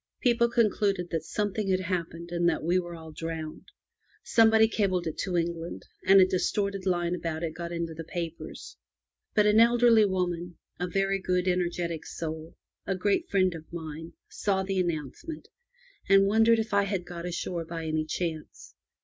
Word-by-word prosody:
People 235 -2 +3
concluded 200 -5 +1
that 165 -2 0
"something 205 +1 -2
had 185 0 +2
happened, 170 -2 -4
and 175 0 +2
that 165 - -2
we 175 +3 +2
were 175 -1 -6
all 160 -1 -10
drowned. 160 - -6 0.5
Somebody 220 -1 +5
cabled 190 -5 0
it 160 - -3
to 180 -2 -1
England, 170 0 -3 0.2
and 195 +1 +7
a 185 - +8
distorted 195 +1 -1
line 175 -1 +1
about 165 -2 -3
it 160 -2 -2
got 170 +1 -6
into 170 -1 -3
the 165 +1 -7
papers. 165 0 -6 0.6
But 210 - +5
an 210 +1 +5
elderly 235 -1 +6
lady 175 -2 -2
— - - -45
a 180 - -1
very 195 +2 0
good, 180 -1 0
energetic 175 -2 -1
soul 160 0 -6 0.2
— - - -59
a 195 - 0
great 200 +2 0
friend 185 -2 +2
of 160 -1 -10
mine, 160 -1 -7
saw 195 -2 -1
the 190 0 -1
announcement, 175 - -4 0.6
and 195 0 +6
wondered 225 +3 +4
if 220 -1 -2
I 200 0 +4
had 190 -3 -2
got 175 0 -6
ashore 175 -1 -3
by 165 0 -6
any 155 0 -1
chance. 160 -1 -5
180 Hz, 175 wpm, -28 LUFS, 165-200 Hz, 0.6 s, a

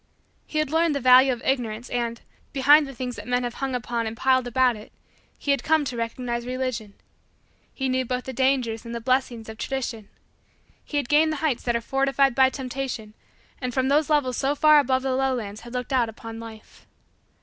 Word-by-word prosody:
He 310 - -4
had 305 -2 0
learned 325 -1 +2
the - - 0
value 255 +1 +6
of 240 -2 -4
Ignorance 240 -3 -1
and, 235 -1 -2 0.3
behind 290 +2 +5
the 275 - -9
things 250 0 -5
that - - -9
men 250 0 +1
have 240 -1 -3
hung 270 -1 -1
upon 235 -1 -2
and 220 +1 -6
piled 260 0 +2
about 250 0 +2
it, 210 0 -12 0.5
he 285 - -1
had 280 - +1
come 315 -2 +2
to 255 - -4
recognize 235 +1 -3
Religion. 250 -4 -4 0.8
He 265 - -3
knew 260 0 +1
both 250 0 -3
the 260 - -6
dangers 255 -3 +1
and 235 0 -7
the - - -3
blessings 250 -2 -1
of 220 0 -9
Tradition. 235 -6 -4 0.7
He 295 - -4
had 285 -4 -1
gained 310 +3 +4
the 310 - -2
heights 270 -6 0
that 240 -1 +1
are 235 - 0
fortified 270 +1 +1
by 265 +1 +5
Temptation 255 -5 -5 0.5
and 250 -2 -3
from 260 0 +1
those 295 +2 +2
levels 280 -5 +1
so 275 +2 0
far 305 0 +6
above 260 -2 +1
the 265 -1 0
lowlands 250 -6 -2
had 240 0 -11
looked 250 +1 -3
out 245 -3 +2
upon 225 0 -9
Life. 225 -1 -12
255 Hz, 205 wpm, -24 LUFS, 235-270 Hz, 0.8 s, value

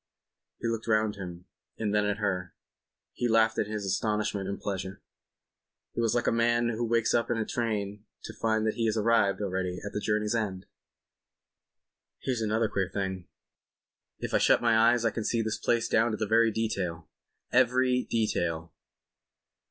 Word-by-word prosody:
He - - -2
looked 115 0 -3
round 110 -1 +2
him 90 -2 -8 0.3
and 105 -2 -1
then 105 0 +3
at 100 - 0
her; 95 -4 -2 0.6
he 120 - -1
laughed 110 -1 +3
in - - 0
his 105 -1 -4
astonishment 100 0 -1
and 100 - -4
pleasure. 95 -1 -4 0.9
He - - -1
was 115 0 +1
like 120 - +1
a - - +3
man 120 +1 +2
who 120 +1 -2
wakes 115 -1 +2
up 115 - +1
in 120 - 0
a 110 - -1
train 105 -4 -2 0.2
to - - -7
find 110 -1 0
that 110 - +1
he 115 -1 0
has 110 0 0
arrived, 110 -2 +2
already, 90 -2 -2
at 105 - -6
the - - -1
journey's 105 0 0
end. 100 -5 -2 1.5
"Here's 125 -3 -2
another 110 +1 +1
queer 95 -3 -1
thing. 95 -2 -3 0.9
If - - -5
I - - +4
shut - - +5
my 115 -2 +3
eyes 115 +1 +4
I 115 - +3
can 115 - -3
see 115 +1 0
this 110 0 -2
place 120 -1 +1
down 110 -1 +2
to 110 - -1
every 115 +2 +4
detail—every 115 - 0
detail. 85 -7 -1
110 Hz, 170 wpm, -29 LUFS, 100-115 Hz, 1.5 s, shut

